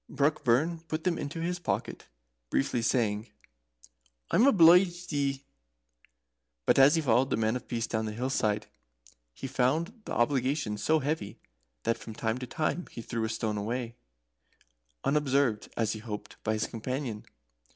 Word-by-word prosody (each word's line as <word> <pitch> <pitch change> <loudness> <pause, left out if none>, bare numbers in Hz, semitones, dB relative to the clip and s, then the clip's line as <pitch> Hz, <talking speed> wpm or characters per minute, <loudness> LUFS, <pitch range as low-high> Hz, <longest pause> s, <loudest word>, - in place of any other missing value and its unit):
"] - - -44
Brockburn 150 +2 +2
put 155 0 -3
them 180 -2 0
into 160 +3 -4
his 175 +1 -2
pocket, 175 - -3 0.4
briefly 135 - 0
saying, 110 -2 0 1.0
"I'm 230 +9 +5
obleeged 180 -4 +6
to - - -3
ye;" 140 -1 -1 1.2
but - - +4
as 135 +3 +7
he 160 - +1
followed 130 0 +3
the - - +1
Man 110 +1 +1
of 125 - -6
Peace 115 -1 -1
down 110 -1 -2
the 110 - -3
hill 125 +5 -2
side, 105 -4 0 0.7
he - - -9
found 160 - 0
the 165 - -5
obligation 130 -3 +1
so 155 +5 +2
heavy, 150 +4 -3 0.4
that 115 - 0
from 110 - -9
time 110 +2 -1
to 125 - -6
time 160 +6 -2
he 115 - -8
threw 115 -1 -2
a - - -2
stone 110 -1 -2
away, 115 +2 -3 1.1
unobserved, 140 -6 +1
as 110 -2 +1
he 110 - -6
hoped, 105 -2 -7
by 110 - +1
his 110 - 0
companion. 120 -1 -4
130 Hz, 160 wpm, -29 LUFS, 115-155 Hz, 1.2 s, as